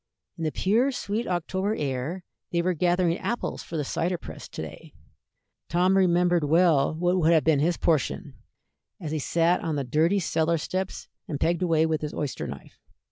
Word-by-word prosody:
In 165 - -4
the 155 - 0
pure, 230 - +2
sweet 225 -2 -3
October 190 +4 -1
air 145 +6 -3 0.3
they 170 -1 +1
were 185 +1 +1
gathering 175 +1 +1
apples 240 - -3
for 165 - -6
the 150 - 0
cider 175 +6 -1
press - - -9
to - - -7
day. - - -11 0.7
Tom 180 +2 +3
remembered 175 -2 +3
well 160 -1 +3
what 175 +2 +1
would 165 -1 +4
have 160 -2 +4
been 155 -3 +3
his 170 +3 +1
portion, 155 -7 0 0.7
as 155 -4 -5
he 155 - -1
sat 170 +4 +2
on 160 -3 -2
the 140 - -1
dirty 160 +9 +2
cellar 165 -2 +1
steps 185 +4 -4 0.2
and 145 -4 -4
pegged 170 +1 +1
away 165 -3 +3
with 160 -1 -1
his 150 -1 -4
oyster 145 -3 -3
knife. - - -10
170 Hz, 185 wpm, -26 LUFS, 155-180 Hz, 0.7 s, would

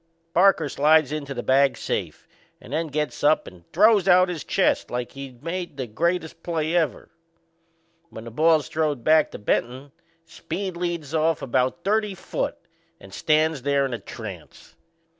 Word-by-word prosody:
Parker 180 -3 +4
slides 150 +1 +3
into 140 -2 -4
the 120 - -4
bag 135 +1 +3
safe - - -4 0.3
and 130 - -11
then 160 +2 -1
gets 150 0 -3
up 150 +2 +3
and 85 -2 -15
throws 215 -4 +4
out 185 0 +5
his 165 -6 -4
chest - - +1
like 125 0 -4
he'd 135 -2 -10
made 175 +2 -5
the 130 - -3
greatest 165 +7 -2
play 165 -2 -2
ever. 160 -6 0 1.0
When 110 - -10
the 115 - -9
ball's 155 +2 +3
throwed 150 -6 -1
back 155 -1 +4
to - - -8
Benton, 125 +6 -2 0.3
Speed 180 +3 -5
leads 170 -4 -4
off 160 0 +1
about 130 +6 0
thirty 210 -1 0
foot - - -4 0.4
and 95 0 -14
stands 155 +3 +1
there 140 +1 +1
in 130 - -4
a 120 - -3
trance. - - -10
155 Hz, 160 wpm, -24 LUFS, 135-170 Hz, 1.0 s, out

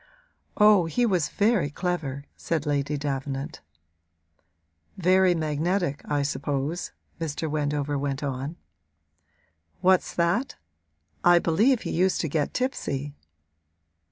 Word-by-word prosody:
'Oh, 210 -5 +6
he 240 +9 +1
was 180 -8 +1
very 205 -8 +2
clever,' 150 -4 -3
said 160 -3 -2
Lady 145 0 0
Davenant. 140 +1 -4 1.4
'Very 185 0 +4
magnetic, 160 +1 -1
I 145 -1 0
suppose,' 140 +4 -2 0.3
Mr. 160 0 -3
Wendover 145 -1 -1
went 140 0 -3
on. 140 +3 -3 1.3
'What's 185 0 +3
that? 175 +10 +1 0.7
I 175 0 +7
believe 215 +10 +3
he - - -3
used 185 +2 +2
to 160 - -1
get 145 -1 -1
tipsy.' 145 - -2
155 Hz, 105 wpm, -26 LUFS, 145-180 Hz, 1.4 s, I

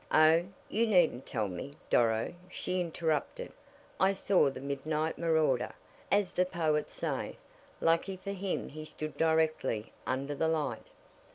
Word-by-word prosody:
"Oh, 160 +2 +6 0.2
you 230 +2 +1
needn't 175 - +3
tell 110 -3 -1
me, 95 +10 -6 0.2
Doro," 115 +2 +3 0.2
she 185 0 -2
interrupted. 170 - -2 0.5
"I 190 +1 +4
saw 195 -5 +3
the 135 - -7
midnight 150 +3 -2
marauder, 155 -7 +2 0.4
as 200 -2 +2
the 180 - +3
poets 160 -4 0
say. - - -3 0.4
Lucky 170 +4 +2
for 200 +2 -5
him 195 -1 -3
he 155 +1 -7
stood 155 0 -6
directly 160 -9 +1 0.2
under 135 +3 -1
the 160 +3 0
light." 150 -7 -1
160 Hz, 135 wpm, -31 LUFS, 140-180 Hz, 0.5 s, Oh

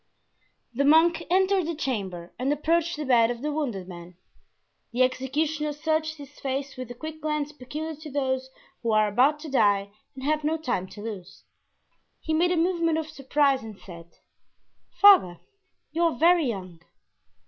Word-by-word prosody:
The 270 +4 0
monk 325 +3 +4
entered 380 -1 +2
the 335 - -2
chamber 195 - -4
and 260 +3 0
approached 330 +3 +1
the 300 - -4
bed 235 -3 +4
of 245 +1 -5
the 300 - -1
wounded 240 -12 -3
man. 175 -1 -11 0.7
The 245 +2 +3
executioner 295 +4 -1
searched 315 +1 -1
his 285 -1 -13
face 275 +1 -3
with 255 -1 -6
the 245 - -9
quick 315 +4 -8
glance 300 -1 -2
peculiar 305 +3 -6
to 310 +1 -10
those 260 -2 -2 0.3
who 230 -2 0
are 215 0 +4
about 260 +8 +3
to 310 -2 -8
die 200 -5 +2 0.2
and 260 - -9
have 305 +2 0
no 315 +2 0
time 245 - -2
to 205 +2 -11
lose. 200 -5 -8 0.8
He 315 - -3
made 340 +3 +3
a 360 - +1
movement 335 -1 +1
of 315 -1 -3
surprise 275 -1 +1
and 220 -2 -9
said: 170 -3 -11 0.9
"Father, 370 - +7 0.5
you 325 +3 -2
are 330 -7 0
very 335 0 +4
young." 185 -7 -5
285 Hz, 170 wpm, -26 LUFS, 230-315 Hz, 0.9 s, Father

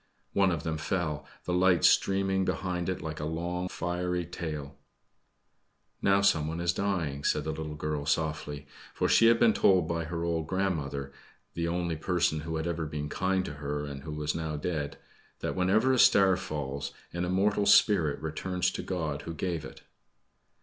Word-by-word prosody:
One 100 -1 +4
of 85 -4 -2
them 80 -2 -2
fell, 75 -3 -2 0.2
the 90 - -2
lights 90 -1 +5
streaming 95 0 +2
behind 90 -1 -2
it 90 - -3
like 80 -1 -5
a 75 - -3
long, 85 +3 -2
fiery 90 0 -2
tail. 75 -5 -6 1.3
"Now 100 0 +4
someone 80 -4 +2
is 85 0 +1
dying," 85 -9 -1
said - - +1
the 80 - -2
little 80 -1 -5
girl 75 -1 -3
softly, 75 -3 -1 0.3
for - - +1
she 115 - +6
had 115 0 +5
been 115 -2 +5
told 90 -4 +4
by 85 -1 -2
her 85 +1 -4
old 85 -2 -1
grandmother 75 -8 -2 0.4
the 85 0 -2
only 85 -1 -1
person 85 -1 +1
who 80 +1 -4
had 80 0 -2
ever 85 -2 -2
been 75 0 -4
kind 95 +3 0
to - - -5
her, 75 0 -2
and 70 -1 -7
who 75 +2 -6
was 75 0 -2
now 80 -2 -3
dead 75 -2 -3 0.4
that - - -2
whenever 105 +8 +3
a 130 - +2
star 95 -4 +6
falls 70 -5 -4 0.2
an 85 +1 -2
immortal 100 +3 +1
spirit 100 -7 +5
returns 90 +3 -1
to - - -4
God 80 -6 -3
who 85 - -6
gave 85 -2 -2
it. - - -11
85 Hz, 175 wpm, -29 LUFS, 75-95 Hz, 1.3 s, she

